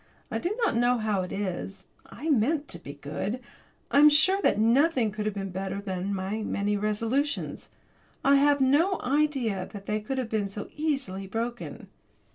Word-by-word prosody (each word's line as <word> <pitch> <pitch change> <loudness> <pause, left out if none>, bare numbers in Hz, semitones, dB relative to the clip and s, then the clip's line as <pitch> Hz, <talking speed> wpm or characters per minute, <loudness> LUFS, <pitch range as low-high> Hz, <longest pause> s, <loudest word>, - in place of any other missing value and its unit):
I - - -1
do 390 +6 -2
not 395 - +1
know 245 +1 +3
how 215 -4 0
it 180 - -5
is, 195 0 -4 0.2
I 310 - -7
meant 290 +5 +2
to - - -2
be 140 - -9
good; 150 - -4 0.5
I 280 - +5
am 300 +1 +9
sure 345 +7 +4
that - - +3
nothing 240 +1 +3
could 210 +1 -3
have 210 - -2
been 195 -1 -4
better 190 +1 -3
than 190 -1 -3
my 195 +3 -2
resolutions. 215 +7 -1 0.6
I 280 0 +6
had 285 +1 +4
no 315 +9 +3
idea 260 -8 0
that 200 -1 -9
they 210 +1 -1
could 265 +6 -4
have 250 -3 -2
been 210 -3 -1
so 205 +1 -7
easily 270 -11 -2
broken. 235 +4 -4
220 Hz, 175 wpm, -27 LUFS, 200-280 Hz, 0.6 s, am